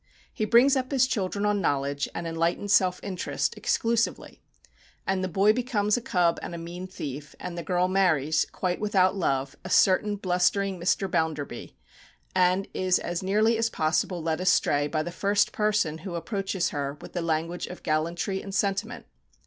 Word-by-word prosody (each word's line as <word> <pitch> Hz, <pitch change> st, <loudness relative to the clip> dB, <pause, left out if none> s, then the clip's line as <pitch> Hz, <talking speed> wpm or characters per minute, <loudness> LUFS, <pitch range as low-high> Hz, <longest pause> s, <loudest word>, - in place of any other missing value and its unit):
He 215 Hz, -, -1 dB
brings 240 Hz, +6 st, +5 dB
up 255 Hz, -1 st, -1 dB
his 265 Hz, -2 st, +4 dB
children 200 Hz, -4 st, -2 dB
on 210 Hz, -1 st, +1 dB
knowledge, 140 Hz, -2 st, -1 dB
and 170 Hz, -, -4 dB
enlightened 165 Hz, +4 st, -1 dB
self 185 Hz, -2 st, +3 dB
interest 190 Hz, -3 st, -2 dB
exclusively; 230 Hz, 0 st, -1 dB, 0.6 s
and 190 Hz, -1 st, 0 dB
the -, -, 0 dB
boy 195 Hz, +4 st, +3 dB
becomes 220 Hz, -4 st, 0 dB
a 245 Hz, -, -2 dB
cub 180 Hz, -8 st, +1 dB
and 170 Hz, -, -6 dB
a -, -, -5 dB
mean 175 Hz, +2 st, -7 dB
thief, 145 Hz, -4 st, -7 dB
and 180 Hz, -1 st, -6 dB
the 170 Hz, -, -4 dB
girl 180 Hz, +2 st, +1 dB
marries, 160 Hz, -5 st, +2 dB
quite 180 Hz, -1 st, -2 dB
without 195 Hz, -3 st, +3 dB
love, 140 Hz, -6 st, -1 dB
a -, -, -7 dB
certain 205 Hz, +2 st, +3 dB
blustering 190 Hz, 0 st, 0 dB
Mr. 185 Hz, +3 st, +1 dB
Bounderby, 160 Hz, -8 st, -3 dB, 0.6 s
and 185 Hz, +1 st, +2 dB
is 185 Hz, -1 st, +2 dB
as 175 Hz, 0 st, -3 dB
nearly 215 Hz, +4 st, +2 dB
as 230 Hz, 0 st, +1 dB
possible 165 Hz, 0 st, 0 dB
led 160 Hz, +1 st, -1 dB
astray 145 Hz, -5 st, +2 dB
by 155 Hz, +1 st, -1 dB
the 175 Hz, -, -5 dB
first 200 Hz, +3 st, +1 dB
person 210 Hz, -7 st, 0 dB
who 175 Hz, +1 st, -6 dB
approaches 195 Hz, 0 st, -2 dB
her 140 Hz, -1 st, -4 dB
with -, -, -11 dB
the 175 Hz, -, -2 dB
language 165 Hz, +1 st, -2 dB
of 180 Hz, -, -10 dB
gallantry 170 Hz, +5 st, -1 dB
and 195 Hz, -1 st, -7 dB
sentiment. 200 Hz, +4 st, -1 dB
185 Hz, 175 wpm, -26 LUFS, 165-205 Hz, 0.6 s, brings